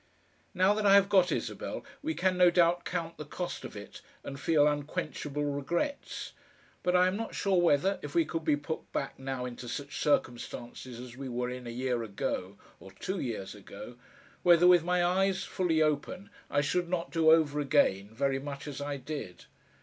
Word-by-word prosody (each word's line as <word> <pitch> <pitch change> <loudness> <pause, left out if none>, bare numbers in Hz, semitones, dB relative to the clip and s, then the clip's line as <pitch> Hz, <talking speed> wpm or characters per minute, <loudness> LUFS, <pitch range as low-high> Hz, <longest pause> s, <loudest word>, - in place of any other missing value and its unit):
Now 185 +3 +4
that 210 0 -1
I 200 - +8
have 200 0 +5
got 185 -3 +4
Isabel - - -4 0.2
we 315 +2 -2
can 185 -1 +1
no 180 -1 +6
doubt 175 0 +3
count 170 -2 -3
the - - -5
cost 175 +4 -5
of - - -8
it - - -9 0.2
and 140 0 -7
feel 150 0 +3
unquenchable 145 0 -2
regrets, 170 - -3 0.5
but 180 0 +1
I 180 0 +6
am 185 +1 +1
not 225 +2 -4
sure 190 -3 +2
whether, 175 +4 +3
if - - -7
we 335 -1 +4
could 165 -1 -4
be 150 - +3
put 155 +2 -6
back 135 - -3
now 135 -1 -3
into 125 0 -7
such 140 +2 -5
circumstances 120 -3 -2
as 125 -1 -9
we 135 -1 -5
were 125 0 -2
in 125 -1 -7
a - - -4
year 125 0 -1
ago, 100 -2 -3 0.2
or 95 - -12
two 190 - -4
years 110 -8 -4
ago, 105 +3 -10 0.5
whether 175 -1 +6
with 175 -2 +7
my 180 0 +2
eyes 190 +2 +1
fully 165 -4 +1
open 155 +6 -2 0.2
I 145 - +2
should 175 +4 0
not 175 -2 -2
do 165 -1 +4
over 155 -2 +4
again 130 -9 +2
very 135 +3 0
much 140 +1 -7
as 145 -1 -6
I 145 0 -3
did. 135 -8 -7
150 Hz, 190 wpm, -30 LUFS, 135-180 Hz, 0.5 s, I